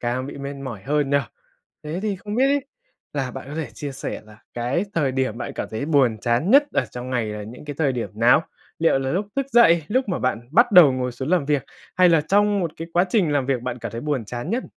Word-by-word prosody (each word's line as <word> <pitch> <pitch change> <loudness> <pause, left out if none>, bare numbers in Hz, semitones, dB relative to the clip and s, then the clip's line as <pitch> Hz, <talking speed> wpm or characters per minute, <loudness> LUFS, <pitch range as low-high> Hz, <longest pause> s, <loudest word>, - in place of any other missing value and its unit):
càng 125 +2 -2
bị 140 - -8
mệt 140 +1 -5
mỏi 130 -8 -7
hơn 145 +3 0
nhỉ? 140 - +4 0.7
Thế 160 +4 -4
thì 210 -3 -1
không 205 +2 -7
biết 260 +3 +3
ấy 280 -1 +1 0.5
là 135 -3 -2
bạn 130 0 -8
có 150 - -7
thể 155 -6 -3
chia 145 +1 -5
sẻ 135 - -5
là 105 0 -16 0.2
cái 125 +10 -1
thời 140 -5 +1
điểm 130 -4 -1
bạn - - -5
cảm - - -4
thấy 110 +5 -3
buồn 130 -8 +3
chán 120 - 0
nhất 280 +4 +7
ở - - +1
trong 125 +1 -7
ngày 120 -3 0
là 105 0 -5
những 115 +7 -10
cái 145 -1 -6
thời 140 -4 +2
điểm 120 -2 -4
nào? 120 +8 +4 0.4
Liệu 165 -4 +3
là 135 0 -2
lúc 200 +3 -1
thức 275 - 0
dậy, 170 -9 +6
lúc 255 +2 0
mà 180 - -1
bạn 120 -1 -2
bắt 235 - +4
đầu 165 -8 +8
ngồi 125 -1 -2
xuống 130 +4 -5
làm 180 -5 +2
việc 140 -2 0 0.3
hay 180 -1 +6
là 165 -2 +4
trong 205 +4 +2
1 170 - -1
cái 165 +1 -7
quá 175 +2 +3
trình 185 -10 +2
làm 140 -3 +1
việc 130 -3 0
bạn 125 -1 -4
cảm - - -6
thấy 115 - -5
buồn 140 -4 -2
chán 120 - -5
nhất? 240 +4 -1
140 Hz, 265 wpm, -22 LUFS, 125-175 Hz, 0.7 s, đầu